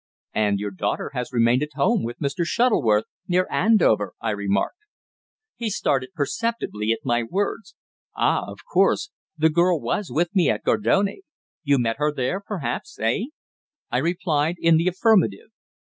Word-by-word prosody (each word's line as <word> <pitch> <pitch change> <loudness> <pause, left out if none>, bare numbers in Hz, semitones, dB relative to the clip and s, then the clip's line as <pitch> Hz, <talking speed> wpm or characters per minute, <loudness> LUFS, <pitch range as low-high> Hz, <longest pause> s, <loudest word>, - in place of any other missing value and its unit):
"And 105 -2 +1
your 100 0 -4
daughter 95 - -3
has 125 0 -4
remained 120 +1 +3
at 150 0 -4
home 200 +10 +2
with 120 +1 -5
Mr. 150 +4 -2
Shuttleworth, 160 - +2 0.2
near 180 0 +2
Andover," 165 - +3
I 115 - -1
remarked. 100 - -1 0.8
He 230 -2 -3
started 135 -6 -1
perceptibly 145 - -2
at 115 - -1
my 120 -2 +2
words. 195 - -3 0.4
"Ah! - - +2
of - - -10
course. 415 -4 +2 0.3
The 160 +1 +4
girl 175 +1 +3
was 200 +5 -2
with 170 +2 0
me 180 -3 +4
at - - -1
Gardone. 200 - +1 0.4
You 140 -3 +2
met 115 -2 0
her 150 0 +2
there, 145 +6 -2
perhaps 170 - -4
eh?" 115 - 0 0.7
I 120 - +1
replied 165 0 0
in 165 -1 +4
the 165 +3 +1
affirmative. 185 - +2
150 Hz, 155 wpm, -23 LUFS, 115-190 Hz, 0.8 s, The